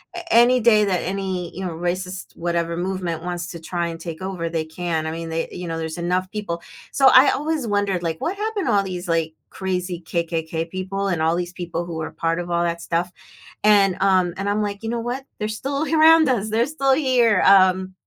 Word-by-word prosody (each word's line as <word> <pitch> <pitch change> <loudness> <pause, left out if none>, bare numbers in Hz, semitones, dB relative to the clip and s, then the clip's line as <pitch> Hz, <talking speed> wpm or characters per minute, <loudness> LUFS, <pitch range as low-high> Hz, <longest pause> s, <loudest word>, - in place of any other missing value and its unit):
a 345 -1 -5
any 245 +2 +6
day 215 -2 +5
that 185 -3 0
any, 185 -2 -3
you 190 +1 -5
know, 170 - -3
racist 180 +2 -4
whatever 170 0 -1
movement 180 -3 -3
wants 175 0 -4
to 170 - -8
try 170 +1 -3
and 165 -1 -6
take 165 0 -7
over, 185 -3 -3
they 165 -1 -2
can. 160 0 -3
I 160 - -2
mean, 165 0 -5
they 165 0 -3
you 180 -1 -6
know, 165 0 -3
there's 160 +1 -4
enough 180 +2 -1
people. 205 -6 -4 0.3
So, 270 -1 +5
I 260 +2 +8
always 300 -4 -2
wondered, 200 -3 0
like, 165 -2 -3
what 380 +4 -2
happened 420 - -2
to - - +2
all 200 -1 +3
these, 180 -2 -6
like, 165 -1 0 0.2
crazy 180 -2 -3
KKK 165 -1 -2
people 190 +2 -3
and 175 -4 -1
all 165 +1 +2
these 175 0 -3
people 175 -1 -4
who 170 -2 -6
were 160 0 -4
part 165 +1 -1
of 175 0 -5
all 170 0 +1
that 170 0 -2
stuff, 175 +1 -1 0.5
and, 200 -3 +5
um, 185 -3 +3
and 200 +1 -2
I'm, 210 +1 +1
like, 205 +1 -4
you 225 - -3
know 235 0 -2
what, 245 +3 -4 0.2
they're 210 - -1
still 275 +7 -3
around 320 -1 +5
us, 215 -4 0
they're 230 +2 +2
still 275 -2 0
here, 250 -7 +3
um, 190 -1 +5
185 Hz, 220 wpm, -22 LUFS, 170-215 Hz, 0.5 s, I